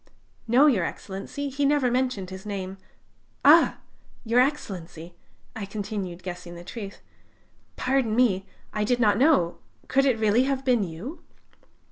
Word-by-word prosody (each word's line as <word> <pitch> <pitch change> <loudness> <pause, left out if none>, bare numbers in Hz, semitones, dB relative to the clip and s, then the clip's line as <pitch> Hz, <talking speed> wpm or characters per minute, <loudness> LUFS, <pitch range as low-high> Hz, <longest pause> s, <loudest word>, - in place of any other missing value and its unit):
"No, 250 +6 +5
Your 235 - +4
Excellency, 200 - -5
he 275 +2 -2
never 280 -3 +3
mentioned 250 -7 -1
his 190 0 -8
name,... 195 -2 -5 0.7
Ah! - - +7 0.5
Your 230 +2 +3
Excellency!" 180 - -2 0.4
I 205 -3 -5
continued, 195 -3 -5
guessing 175 -1 -7
the 170 - -9
truth: 200 +1 -8 0.7
"pardon 255 -4 +1
me... 195 -6 +2 0.3
I 210 - 0
did 245 +3 +1
not 210 -2 +3
know... 265 - +3 0.3
could 275 +1 +3
it 255 -4 +3
really 220 +3 +3
have 270 -1 -2
been 245 -5 +3
you?" 190 - -7
215 Hz, 140 wpm, -26 LUFS, 190-260 Hz, 0.7 s, Ah